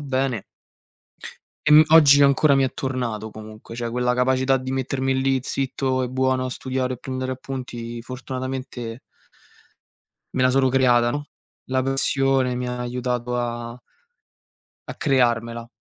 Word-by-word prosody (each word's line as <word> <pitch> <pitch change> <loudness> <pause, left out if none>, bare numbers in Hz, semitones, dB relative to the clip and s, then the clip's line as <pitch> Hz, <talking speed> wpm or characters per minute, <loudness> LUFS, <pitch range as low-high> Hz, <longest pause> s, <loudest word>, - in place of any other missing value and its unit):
bene. 130 -5 -1 1.2
Ehm, 150 +1 +8
oggi 145 -3 +8
ancora 140 +1 +4
mi 135 - +3
è 130 -1 -1
tornato 120 -5 -3
comunque, 110 +1 -11
cioè 120 0 -3
quella 125 +1 0
capacità 130 +1 +2
di 130 0 -6
mettermi 130 0 -1
lì 135 0 +2
zitto 130 -1 -1
e 125 - -2
buono 130 0 +1
a 130 - -3
studiare, 130 -1 -3
prendere 130 0 -4
appunti, 120 -3 -6
fortunatamente 130 -1 -6 1.4
me 130 - +1
la 130 - +4
sono 130 0 +3
creata, 125 -2 +3
no, 145 +2 -4 0.4
la 130 0 0
passione 135 -1 +1
mi 125 0 -3
ha 125 0 -4
aiutato 125 0 -2
a 120 0 -4 1.1
a - - -6
crearmela. 115 -4 0
130 Hz, 135 wpm, -23 LUFS, 120-135 Hz, 1.4 s, Ehm